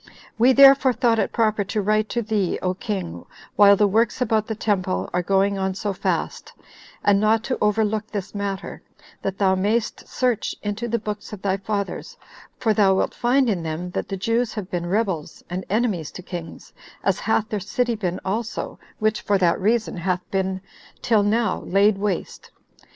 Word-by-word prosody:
We 245 +3 +6
therefore 270 -1 +7
thought 230 -1 +2
it - - 0
proper 220 -2 +1
to 210 - -2
write 215 +1 +1
to 240 -1 -1
thee, 205 -4 0
O 185 0 +1
king, 185 -2 -5 0.3
while 200 -1 +7
the 210 - +3
works 220 +3 +1
about 220 -3 +1
the 220 - -3
temple 185 - -1
are 180 - +1
going 195 +2 +1
on 190 0 -1
so 205 0 -2
fast, - - -3 0.5
and 200 -1 +4
not 215 +1 +2
to 255 - -2
overlook 210 0 +1
this 200 -3 -5
matter, 200 -1 -4 0.4
that 195 0 -3
thou 190 -2 +3
mayst 210 +5 -1
search 250 -4 -1
into 210 +3 -3
the 235 0 0
books 210 -1 -6
of 195 - -9
thy 195 -1 +1
fathers, 200 0 -4 0.4
for 220 -3 +1
thou 200 -3 +4
wilt - - 0
find 255 +2 +2
in 195 -6 0
them 165 +2 -4
that - - -3
the 195 - -3
Jews 230 +5 0
have 200 -4 -6
been 175 -1 -2
rebels, 190 -5 -2
and 185 +1 -3
enemies 205 -7 0
to 185 - -9
kings, 175 -2 -8 0.3
as - - +1
hath 215 - 0
their 210 - -2
city 240 +5 -1
been 185 -5 -3
also, 220 +4 -3 0.2
which, 215 0 0
for 205 - +2
that 175 -2 +2
reason, 220 0 +1
hath 180 +1 -1
been 190 -1 -1 0.4
till 220 -3 +3
now 220 +2 +1
laid 195 +2 +2
waste. 200 -3 -3
205 Hz, 185 wpm, -23 LUFS, 190-220 Hz, 0.5 s, therefore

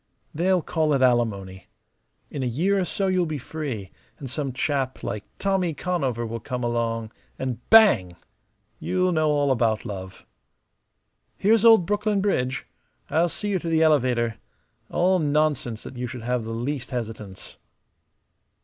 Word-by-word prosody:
They'll 180 +2 +2
call 155 -3 +1
it 130 - +2
alimony. 100 -7 0 0.6
In 140 - -4
a 130 - 0
year 180 +12 +1
or 185 - 0
so 195 +3 -2
you'll 185 -2 +1
be 155 -1 -3
free; 130 -9 -5 0.3
and 135 - -7
some 135 +1 -3
chap 135 0 -2
like 105 0 -4
Tommy 190 -5 0
Conover 135 -9 -1
will 115 +1 -4
come 125 +3 -4
along, 115 -2 -1 0.3
and 130 -3 -3
bang! 205 - +6 0.7
You'll 185 0 +1
know 155 -2 +2
all 145 -2 +2
about 115 -3 +1
love. 95 -3 -7 1.1
Here's 220 +2 +3
old 225 -6 +7
Brooklyn 205 +1 0
Bridge. 130 -10 0 0.5
I'll 170 +2 +3
see 210 +5 -4
you 195 -2 +1
to 165 - -4
the 160 0 +3
elevator. 125 -7 +2 0.5
All 185 +1 +2
nonsense 145 -7 0
that 130 - -9
you 125 0 -3
should 120 -1 -7
have 125 -1 -1
the - - -6
least 120 +3 -3
hesitance." 110 -6 -6
135 Hz, 150 wpm, -24 LUFS, 120-175 Hz, 1.1 s, old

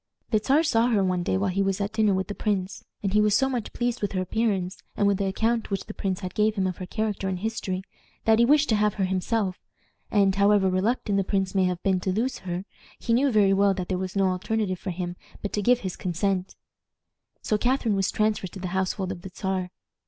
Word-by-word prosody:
The 215 - +4
Czar 290 +4 +4
saw 235 -6 +3
her 215 -5 +2
one 185 -1 +1
day 190 +1 0
while 195 -1 0
he 195 +2 0
was 195 0 0
at 205 +1 -2
dinner 215 -3 +3
with 190 0 -1
the 205 - -4
prince, 195 -3 -2 0.2
and 195 -1 -1
he 210 - +5
was 210 -1 +3
so 265 - +3
much 245 -5 -3
pleased 240 0 -2
with 205 - -1
her 185 - 0
appearance, 190 -2 -1 0.2
and 205 - +2
with 200 -1 +3
the 200 - 0
account 225 +4 0
which 195 -2 -2
the 215 - -7
prince 190 -2 -2
gave 215 0 +2
him 195 -2 0
of 185 -2 -2
her 185 - -6
character 215 -2 -2
and 185 - -2
history, 190 -2 -3 0.4
that 220 0 +5
he 235 - +6
wished 295 +3 +4
to 220 - +4
have 210 0 +2
her 195 - -1
himself; 190 +1 -1 0.5
and, 200 -2 +3
however 200 -1 +4
reluctant 205 +2 0
the - - +2
prince 190 -1 -1
may 190 -2 +3
have 180 -1 -2
been 190 -2 +2
to 185 +1 -1
lose 230 +7 -1
her, 180 +1 -4 0.3
he 230 - -1
knew 265 +3 +3
very 205 -3 +4
well 195 0 +3
that 180 -1 -4
there 185 - 0
was 185 0 -4
no 195 -1 +3
alternative 190 0 -1
for 195 - -5
him 175 0 -4 0.3
but 205 - -3
to 210 - 0
give 245 +4 +3
his 185 -2 -4
consent. 185 +1 -1 0.9
So 215 - +1
Catharine 245 -3 +1
was 195 -1 +1
transferred 215 -3 0
to 195 - -7
the 185 -1 -4
household 190 +1 -1
of 180 -2 -7
the 190 - -8
Czar. 185 -1 -3
195 Hz, 240 wpm, -26 LUFS, 185-215 Hz, 0.9 s, he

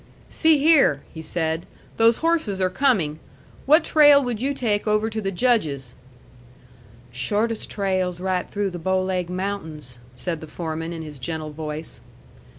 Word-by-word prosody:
"See 320 -2 +4
here," 280 - +4
he 160 - -7
said; 160 0 -2 0.3
"those 230 +6 +3
horses 320 - +1
are 185 -1 +1
coming. 185 - +1 0.5
What 310 +4 +6
trail 290 -3 +6
would 240 -3 -3
you 275 +2 0
take 225 -7 -1
over 215 +1 +1
to 220 0 -3
the 195 - -2
Judge's?" 160 - 0 1.2
"Shortest 210 - -1
trail's 185 -3 -1
right 185 -1 -2
through 200 -1 -2
the 175 - -6
Bow 190 +3 +1
Laig 180 -2 -2
Mountains," 160 -9 -5 0.2
said 165 +4 -4
the 160 - -8
foreman, 160 +1 -5
in 165 -1 -6
his 150 -3 -9
gentle 155 +2 -5
voice. 155 +1 -7
185 Hz, 155 wpm, -23 LUFS, 160-225 Hz, 1.2 s, What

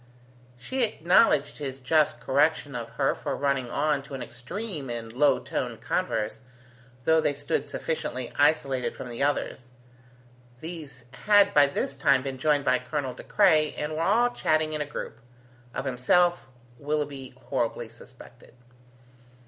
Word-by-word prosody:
She 260 - -2
acknowledged 175 -8 +3
his 135 -3 -4
just 145 -2 +2
correction 145 +3 +1
of 120 -1 -5
her 135 +3 +1
for - - -4
running 140 -3 0
on 150 +2 0
to 135 0 -9
an 130 - -5
extreme 150 - -6
in 115 -1 -5
low 135 +3 +3
toned - - -4
converse, 105 0 -1 0.6
though 160 +2 +4
they 145 - 0
stood 145 0 -2
sufficiently 130 -6 -4
isolated 135 -4 +1
from 125 - -7
the 120 +1 -6
others. 140 -3 -1 0.9
These 150 -6 -8 0.2
had 205 -1 +6
by 145 -1 +6
this 140 -1 -3
time 135 -1 +3
been 135 -1 -5
joined 145 0 +2
by 130 - +3
Colonel 130 0 -3
De - - -10
Craye, 155 -1 +3
and 150 +1 -3
were 155 - -2
all 230 +8 +3
chatting 155 -8 +1
in 155 - -2
a 145 - -3
group 115 -5 -7 0.5
of 130 - -4
himself, 140 +5 +2 0.3
Willoughby 145 -3 -3
horribly - - -2
suspected. - - -16
145 Hz, 150 wpm, -27 LUFS, 130-155 Hz, 0.9 s, had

